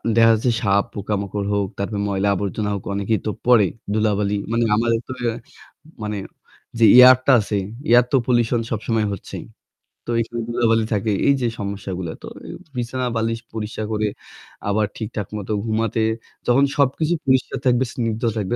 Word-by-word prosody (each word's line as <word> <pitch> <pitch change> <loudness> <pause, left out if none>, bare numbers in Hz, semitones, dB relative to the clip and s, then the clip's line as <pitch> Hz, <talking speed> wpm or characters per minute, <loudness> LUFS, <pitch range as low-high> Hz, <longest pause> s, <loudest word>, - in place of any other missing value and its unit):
দেখা 115 0 +6
যাচ্ছে 115 +3 +1
সাপ, 100 -2 +3
পোকামাকড় 100 0 -3
হোক, 100 -1 +1
তারপরে 100 +1 -3
ময়লা 100 0 0
আবর্জনা 105 +2 -2
হোক, 100 - -6
অনেকেই 100 +1 0
তো 110 - 0
পড়ে 120 -5 +5 0.3
ধুলাবালি। 105 -1 +1 0.2
মানে 115 0 +2
আমাদের 115 +1 +1
তো - - -7 0.9
মানে 105 0 -3 0.6
যে 115 - +6
এয়ার 125 0 +10
টা - - +5
আছে 105 0 -2 0.3
এয়ার 120 +1 +6
তো 135 - +4
পলিউশন 120 -1 +2
সবসময় 110 0 0
হচ্ছেই। 100 - -8 0.6
তো - - -3
এখানে 115 +1 -4
ধুলাবালি 115 -1 +2
থাকে। 105 +1 0 0.2
এই 140 - +6
যে 120 - +1
সমস্যাগুলা। 95 -4 -4
তো - - -9 0.5
বিছানা 125 +1 -2
বালিশ 115 0 -1
পরিষ্কার 110 0 -4
করে 105 0 0 0.6
আবার 105 +1 +2
ঠিকঠাক 105 -3 -5
মতো 105 +1 -6
ঘুমাতে 110 0 0 0.5
যখন 125 +3 +4
সবকিছু 145 +4 +2
পরিষ্কার 130 -1 +1
থাকবে, 125 0 +3
স্নিগ্ধ 115 -2 -2 0.2
থাকবে 105 +2 -1
110 Hz, 155 wpm, -21 LUFS, 100-120 Hz, 0.9 s, এয়ার